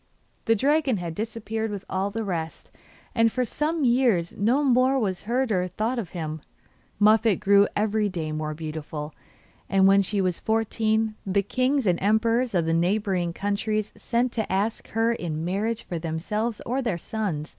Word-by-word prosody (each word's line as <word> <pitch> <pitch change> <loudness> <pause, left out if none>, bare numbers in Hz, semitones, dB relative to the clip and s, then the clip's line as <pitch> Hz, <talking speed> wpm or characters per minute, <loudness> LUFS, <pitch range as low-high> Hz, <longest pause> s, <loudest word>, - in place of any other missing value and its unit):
The 225 - +4
dragon 275 0 +2
had 170 -3 -4
disappeared 220 +2 -3
with 200 -2 -6
all 190 +1 -1
the 225 +2 -3
rest, 165 -5 -4 0.4
and 230 -1 +3
for 255 +1 0
some 305 +5 -1
years 235 -9 +2
no 240 +9 +2
more 260 0 +3
was 195 -7 -1
heard 250 0 +1
or 180 -2 +1
thought 225 +7 -2
of 195 -8 -5
him. 155 -2 -4 0.6
Muffette 215 0 +4
grew 200 +1 +5
every 210 0 +1
day 165 -5 -4
more 155 0 -3
beautiful, 155 -1 -6 0.6
and 195 -1 +4
when 195 +1 +6
she 200 +1 -1
was 185 -2 0
fourteen 220 0 0
the 200 +1 +1
kings 255 +5 +1
and 180 -3 +1
emperors 225 +3 +2
of 170 -2 +2
the 165 - +1
neighbouring 180 0 +1
countries 205 +3 -2
sent 245 +1 0
to 220 -5 -3
ask 205 +4 -1
her 225 +1 +1
in 165 -6 -4
marriage 215 +5 -1
for 170 - -4
themselves 205 +8 -2
or 255 +3 -1
their 230 -9 -1
sons. 170 -6 -3
210 Hz, 170 wpm, -25 LUFS, 180-230 Hz, 0.6 s, when